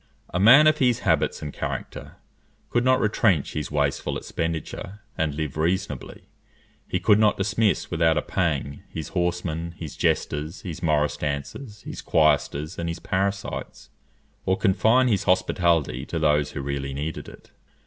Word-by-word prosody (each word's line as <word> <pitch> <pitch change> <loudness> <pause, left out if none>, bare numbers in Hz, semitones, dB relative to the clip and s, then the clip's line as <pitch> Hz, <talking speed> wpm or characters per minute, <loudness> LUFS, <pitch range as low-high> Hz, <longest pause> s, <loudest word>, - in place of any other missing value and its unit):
A 90 - 0
man 125 +10 +8
of 155 0 +4
his 125 -3 +2
habits - - +1
and 75 - -5
character - - -5 0.6
could 120 - +2
not 130 0 +4
retrench 105 - +2
his 75 - -3
wasteful 70 -2 -1
expenditure, 85 +5 -4
and 80 -2 -1
live 75 -2 -4
reasonably; 85 -3 -2 0.6
he - - -1
could 105 - +4
not 105 -1 +3
dismiss 105 +2 0
without 80 -1 +2
a 75 - 0
pang 75 -6 -1
his 80 - -6
horsemen, 85 -2 -2
his 80 -4 -7
jesters, 75 +5 -1
his 90 -5 -7
morris 75 -3 +1
dancers, 75 - -5
his - - -7
choristers, 75 +1 +1
and 85 0 -2
his 85 - -4
parasites, 100 +3 -3 0.5
or 95 0 +1
confine 115 +5 +3
his 105 -6 +1
hospitality 85 -7 +1
to 85 - -3
those 75 -2 +2
who - - -4
really 70 -1 -3
needed 75 +3 -5
it. - - -16
85 Hz, 150 wpm, -24 LUFS, 75-100 Hz, 0.6 s, man